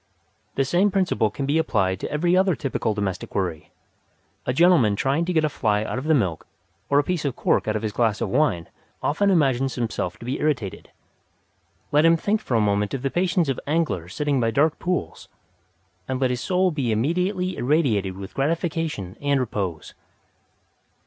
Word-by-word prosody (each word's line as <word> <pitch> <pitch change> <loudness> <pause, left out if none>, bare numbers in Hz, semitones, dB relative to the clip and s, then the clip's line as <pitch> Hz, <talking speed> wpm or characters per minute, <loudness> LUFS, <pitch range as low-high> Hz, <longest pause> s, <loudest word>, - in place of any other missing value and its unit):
The 135 - +1
same 180 +8 +3
principle 185 - +1
can 135 +7 -4
be 145 +4 +2
applied 95 - 0
to - - -4
every 175 +4 +2
other 185 -2 +3
typical 130 -7 -2
domestic 100 -3 -4
worry. 90 -6 -2 0.8
A - - +2
gentleman 145 - +4
trying 140 +9 0
to 180 - -1
get 160 -3 +2
a - - +3
fly 105 -6 0
out 125 - -3
of 130 - -7
the 160 0 +4
milk 95 - -1 0.4
or 140 - +3
a 145 - +4
piece 180 +1 -2
of 140 -4 -2
cork - - +1
out 110 - 0
of 110 - -2
his 110 - -1
glass 110 0 +1
of - - -1
wine 125 - +1 0.4
often 200 +7 +2
imagines 135 -7 +2
himself 110 -7 -3
to - - -11
be 130 +3 -2
irritated. 130 -11 -2 1.0
Let 150 +1 +4
him 165 0 +5
think 210 +5 0
for 125 - -2
a - - +4
moment 105 +1 +1
of 130 - -6
the 135 - -1
patience 175 -2 +1
of 135 - -1
anglers 145 - -1
sitting 145 -2 0
by 115 -2 +2
dark 145 +7 +2
pools, 180 0 -3 0.8
and 130 -1 -2
let 130 -2 +1
his 125 -1 -2
soul 185 +3 +1
be 135 -7 -1
immediately 180 - 0
irradiated 120 - +1
with 95 +1 -8
gratification 155 - -2
and 140 -1 +2
repose. 100 -9 -3
135 Hz, 190 wpm, -23 LUFS, 110-165 Hz, 1.0 s, him